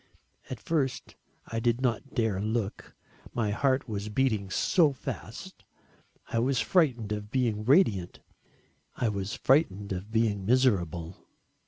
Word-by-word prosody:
At 130 - -5
first 140 -4 -2 0.3
I 115 - -3
did 120 +1 +1
not 130 +2 -2
dare 110 -6 +1
look 110 -1 -3 0.4
my 110 -3 0
heart 130 +4 +1
was 105 -1 -4
beating 105 -4 0
so 150 - +3
fast. 135 - -8 0.7
I 115 - 0
was 130 +2 +1
frightened 125 - +2
of 105 0 -4
being 110 -4 0
radiant. 115 - +3 0.8
I 120 - 0
was 100 0 -3
frightened 105 - +2
of 95 +2 -4
being 110 -3 +1
miserable. 95 -8 +1
115 Hz, 130 wpm, -28 LUFS, 100-130 Hz, 0.8 s, so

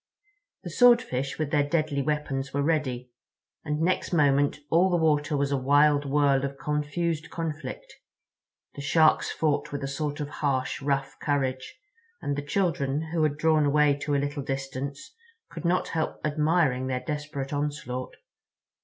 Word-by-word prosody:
The - - -6
Swordfish 235 - +3
with 155 -2 -2
their 150 - +3
deadly 145 -1 0
weapons 140 -2 -2
were 140 - +1
ready—and 140 0 -4
next 175 +3 0
moment 145 -3 +3
all 175 +3 +4
the 175 - +2
water 150 -2 +1
was 140 0 0
a 140 - +2
wild 145 +2 +4
whirl 140 -1 +3
of 140 0 -3
confused 150 +2 -2
conflict. 165 - -6 0.8
The 140 - -7
Sharks 155 +3 +3
fought 150 -3 -1
with 145 -1 -4
a - - -2
sort 145 +2 -3
of 145 - -3
harsh, 135 -3 0
rough 135 -1 -1
courage, 130 -3 -2 0.4
and 145 - -2
the 145 - -2
children, 150 -2 -1
who 165 -1 0
had 150 -2 +1
drawn 155 0 +3
away 145 0 +4
to 145 0 -1
a - - +3
little 145 +1 -2
distance, 135 +1 -5 0.4
could - - -7
not 180 +2 +1
help 160 -1 -2
admiring 150 -4 +1
their 130 -1 -2
desperate 145 -2 -4
onslaught. 145 -3 -3
145 Hz, 155 wpm, -27 LUFS, 140-155 Hz, 0.8 s, all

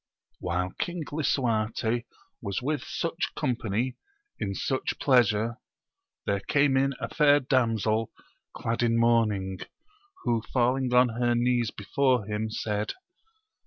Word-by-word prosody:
HILE 90 +2 -1
King 175 -2 -2
Lisuarte 120 -5 0 0.4
was 100 -3 -2
with 145 +4 -1
such 165 +1 -3
company 120 -2 -1 0.4
in 100 -1 -2
such 130 +5 -1
pleasure, 115 -4 +3 0.7
there 100 0 +1
came 140 +5 +2
in 135 0 +2
a - - -3
fair 145 -2 +4
damsel 115 -5 +1 0.5
clad 115 +1 -2
in 115 -1 +2
mourning, 105 -5 +2 0.6
who 115 -2 +1
falling 125 +1 +2
on 125 0 +5
her 120 +1 +1
knees 120 -1 +2
before 125 +2 +1
him, 105 +1 -2
said. 105 -1 -2
120 Hz, 120 wpm, -27 LUFS, 110-130 Hz, 0.7 s, on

